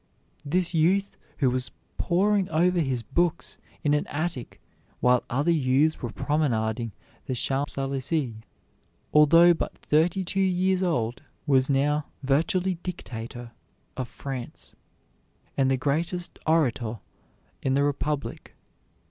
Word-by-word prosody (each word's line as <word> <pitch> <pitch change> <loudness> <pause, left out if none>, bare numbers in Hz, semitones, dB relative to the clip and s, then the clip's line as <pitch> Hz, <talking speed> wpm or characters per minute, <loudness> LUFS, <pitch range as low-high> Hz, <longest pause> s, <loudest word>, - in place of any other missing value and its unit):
This 175 +5 0
youth 185 +5 +2 0.2
who 130 -3 +2
was 125 0 -1 0.3
poring 195 +2 +2
over 175 +3 +2
his 130 -6 -1
books 170 +6 -1 0.2
in 145 - +3
an 150 - +1
attic 155 -5 -4 0.4
while 125 0 +4
other 145 +7 +1
youths 150 0 +2
were 120 - -3
promenading 115 -5 0 0.4
the 130 - -1
Champs 135 +3 -1
Elysées, 135 0 -1 0.8
although 165 +3 +7
but 165 - -4
thirty 170 +5 +1
two 195 +2 -2
years 185 0 +2
old, 125 -10 0 0.2
was 135 -2 +3
now 145 +2 +1 0.2
virtually 170 +6 +1
dictator 120 -9 -7 0.4
of 130 -1 -3
France, 130 -3 -7 0.8
and 135 -1 +2
the 135 - +2
greatest 165 +6 -2
orator 125 -8 +1 0.6
in 135 0 +1
the 140 - +3
Republic. 145 0 -3
145 Hz, 120 wpm, -26 LUFS, 130-170 Hz, 0.8 s, although